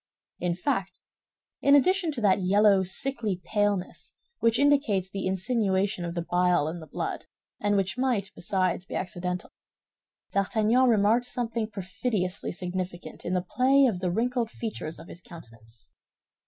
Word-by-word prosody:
In 175 -1 -1
fact, 185 +1 -2 0.6
in 280 0 +6
addition 360 +3 +3
to 245 - -4
that 200 -1 +3
yellow, 200 +1 +4
sickly 205 +1 -1
paleness 205 -3 -1 0.2
which 230 0 +3
indicates 275 -10 +2
the 195 -1 -3
insinuation 190 -1 0
of 170 0 -5
the 170 - -2
bile 175 -3 +2
in 170 +2 -4
the 160 - -11
blood, - - -4 0.3
and 205 0 +1
which 195 +5 -1
might, 240 -7 0
besides, 185 -1 -1
be - - -8
accidental, 180 0 -4 0.8
D'Artagnan 220 +5 +2
remarked 225 +3 +3
something 230 -3 -2
perfidiously 195 -1 -3
significant 180 0 -5
in 180 - -1
the 180 0 -1
play 270 +5 +4
of 215 -8 +1
the 185 -1 -1
wrinkled 235 +4 0
features 215 -9 -5
of - - -12
his 175 - -11
countenance. 115 -10 -13
195 Hz, 145 wpm, -27 LUFS, 180-230 Hz, 0.8 s, in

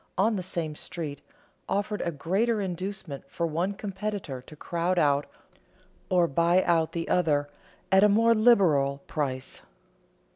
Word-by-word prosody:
on 215 +4 +3
the 190 - -2
same 170 -4 -3
street, 155 -3 -6 0.5
offered 205 +1 -1
a 170 - -1
greater 195 +10 0
inducement 185 -5 -4
for 170 - -2
one 170 +4 -1
competitor 195 -8 -5
to 150 - -14
crowd 170 +3 -1
out 145 -3 +2 0.8
or 180 -2 +4
buy 170 +5 +3
out 165 -2 +1
the 165 -1 -3
other 150 -5 +2 0.4
at 190 +1 +6
a 210 - +6
more 230 +3 +4
than 215 -1 0
liberal 145 - +4
price. 130 -4 -4
175 Hz, 145 wpm, -27 LUFS, 150-200 Hz, 0.8 s, at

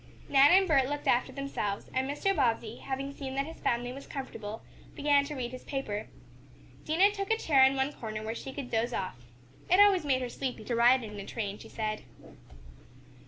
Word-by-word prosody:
Nan 275 +1 +6
and 380 +1 +6
Bert 275 -5 +3
looked 290 0 -4
after 245 +2 +2
themselves, 260 -7 -3
and 260 +1 0
Mr. 390 +7 0
Bobbsey, 230 -5 0
having 275 +1 -4
seen 270 -2 -6
that 275 +1 0
his 325 +2 -10
family 245 +1 -1
was 275 +1 -10
comfortable, 225 -6 -6 0.3
began 285 -1 +3
to 295 +1 -6
read 245 -2 -4
his 255 - -9
paper. 220 -7 -4 0.8
Dinah 360 +6 +4
took 395 -1 -4
a 445 - +3
chair 280 -10 +4
in 265 +1 +5
one 270 +2 0
corner 215 -4 -6
where 220 +1 -3
she 265 - -7
could 265 -2 -7
doze 235 +2 0
off. 185 - -4 0.5
It 365 +2 +5
always 405 -4 +6
made 260 -3 +1
her 245 - -3
sleepy 255 -3 -4
to 240 - -1
ride 245 +2 +5
in 210 -2 -7
a 195 - -6
train, 205 -3 -4
she - - -12
said. 215 -1 -3
265 Hz, 205 wpm, -30 LUFS, 230-285 Hz, 0.8 s, Nan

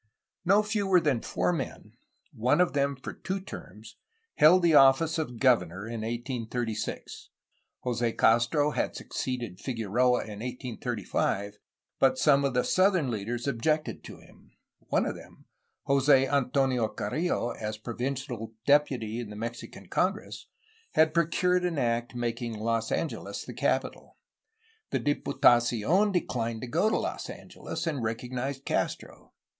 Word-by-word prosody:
No 200 +4 +4
fewer 205 -4 +2
than 145 -8 +1
four 180 - 0
men, 140 -6 -5 0.4
one 125 +8 +2
of 180 - +3
them 140 -1 +1
for 130 - -7
two 190 +1 -4
terms, 110 - -11 0.4
held 175 +4 +6
the 170 -2 +4
office 140 +4 +5
of 125 -7 -4
governor 100 -7 +2
in 115 0 -5
1836. 115 -1 -4 0.5
Jose 120 -1 0
Castro 120 +6 +3
had - - -2
succeeded 120 -8 -4
Figueroa 125 +1 +1
in 105 -2 -8
1835, 115 -4 -3 0.4
but 130 -1 +4
some 140 -1 +4
of 135 -2 0
the 125 - +3
southern 185 -8 +2
leaders 115 +3 -3
objected 150 +4 -1
to - - -9
him. - - -20 0.4
One - - +1
of - - -2
them, - - -14 0.4
Jose 135 -1 +4
Antonio 130 -3 +1
Carrillo, 120 +4 -2
as 110 -1 -5
provincial 120 -1 -4
deputy 130 -6 +2
in 120 -3 -5
the 105 - -8
Mexican 115 +3 -7
congress, - - -2 0.5
had 155 0 +4
procured 180 +2 +2
an 175 -3 -1
act 120 -1 -1
making 120 -1 -3
Los 115 +1 -1
Angeles 165 - -3
the - - -8
capital. - - -2 0.7
The - - 0
Diputacion 135 - +3
declined 115 - -2
to 125 - -5
go 170 - +2
to - - +1
Los - - -4
Angeles, 160 +1 -7
and 150 -6 -2
recognized 125 +4 -3
Castro. - - -3
125 Hz, 135 wpm, -28 LUFS, 115-150 Hz, 0.7 s, held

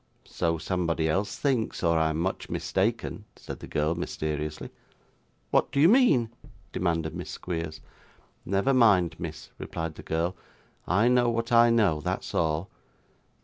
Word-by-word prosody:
'So 85 0 -1
somebody 85 -1 -1
else 100 +6 -1
thinks, 130 -9 -1
or 85 -1 +3
I 80 0 +2
am 80 - -2
much 95 +4 -2
mistaken,' 105 +1 -1
said - - -8
the - - -9
girl 75 +2 0
mysteriously. 75 -2 -4 0.8
'What - - +2
do 140 - 0
you 155 - +7
mean?' 175 - +4 0.4
demanded 80 -3 -1
Miss - - -6
Squeers. 80 -3 -5 0.6
'Never 100 +8 +1
mind, 105 -9 +4
miss,' 80 -2 -7
replied 80 -1 -4
the - - -10
girl; 85 +3 -1 0.5
'I 105 +7 +3
know 125 -1 +4
what 115 0 -2
I 120 0 +6
know; 105 -9 +3
that's - - -3
all. 80 +2 0
90 Hz, 145 wpm, -27 LUFS, 80-115 Hz, 0.8 s, you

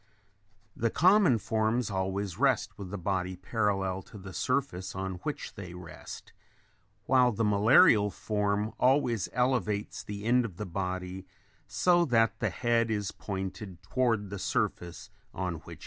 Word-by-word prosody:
The 115 - 0
common 180 - +5
forms 110 +2 0
always 95 0 -2
rest 135 -3 +2
with 100 -2 -8
the 100 - -4
body 95 0 -2
parallel 95 -1 -1
to - - -11
the 95 -1 -9
surface 125 -7 -2
on 95 -1 -4
which 145 -1 -5
they 90 -3 -9
rest, 90 -2 -10 0.7
while 125 0 +4
the 115 +1 -1
malarial 105 - +5
form 105 +1 -1
always 125 -5 +2
elevates 125 -4 0
the 100 0 -7
end 125 +2 +4
of 100 -7 -7
the 105 - -4
body 95 0 -4 0.4
so 175 -1 +3
that 115 -4 +2
the - - 0
head 115 -2 +1
is 105 -3 -1
pointed 95 -2 -6
toward 110 -1 0
the 100 - -5
surface 90 +3 -2 0.2
on 90 -3 -2
which 80 - -17
it - - -9
rests. - - -13
105 Hz, 150 wpm, -29 LUFS, 95-120 Hz, 0.7 s, common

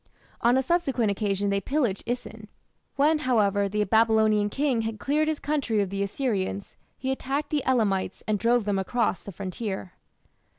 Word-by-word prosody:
On 240 +2 +4
a 265 - +2
subsequent 265 -8 +1
occasion 200 -1 -1
they 200 0 +1
pillaged 245 -4 0
Isin. 230 -3 -5 0.5
When, 300 +3 +3
however, 205 -7 +2
the 210 +1 0
Babylonian 220 -1 +3
king 270 0 0
had 225 -1 -3
cleared 300 +5 +1
his 310 -1 -1
country 280 -8 0
of 195 -2 0
the 200 0 -2
Assyrians, 200 -2 -2 0.2
he 265 0 -2
attacked 270 +3 -2
the 295 -3 0
Elamites 205 -7 +1
and 215 -1 +1
drove 235 0 +2
them 200 -2 0
across 215 0 0
the 200 - -8
frontier. 190 0 -5
220 Hz, 165 wpm, -26 LUFS, 200-260 Hz, 0.5 s, On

